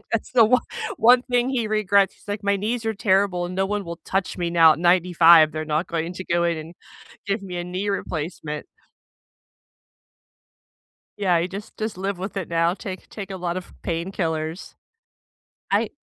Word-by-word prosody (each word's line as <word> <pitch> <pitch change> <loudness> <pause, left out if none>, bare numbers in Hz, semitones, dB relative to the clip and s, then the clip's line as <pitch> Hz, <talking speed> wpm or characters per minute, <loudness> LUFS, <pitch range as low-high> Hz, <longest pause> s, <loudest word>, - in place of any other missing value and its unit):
That's 225 - -1
the 235 -3 +6
one 250 +3 +3 0.3
one 245 +2 +6
thing 245 0 0
he 245 -4 -1
regrets, 200 -2 +2
he's - - -24
like, 205 0 -3
"My 200 0 +2
knees 225 +3 -2
are 220 - 0
terrible, 195 -3 +1
and 180 +1 -5
no 190 - +1
one 205 0 -2
will 170 0 -7
touch 190 -1 -2
me 175 -1 -1
now 165 -2 +6
at - - -10
95. 170 -2 +6
They're 155 0 -3
not 155 +3 -1
going 165 +1 -2
to 185 +1 -7
go 170 0 +1
in 170 -1 +1
and 160 +2 -8 0.5
give 200 +1 -1
me 180 -2 -6
a 175 - -3
knee 185 +3 -3
replacement." 155 -4 -4 2.5
Yeah, 180 -4 +2
he 175 - -2
just 200 +2 -9
just 215 -3 -4
live 195 -1 -3
with 195 +2 -6
it 190 -4 -3
now, 170 +1 +1
take 190 -3 -8
take 200 -2 -8
a 190 - -4
lot 175 -1 -3
of 185 - -7
painkillers. 165 -1 -3 1.0
I - - +2
185 Hz, 185 wpm, -23 LUFS, 170-205 Hz, 2.5 s, the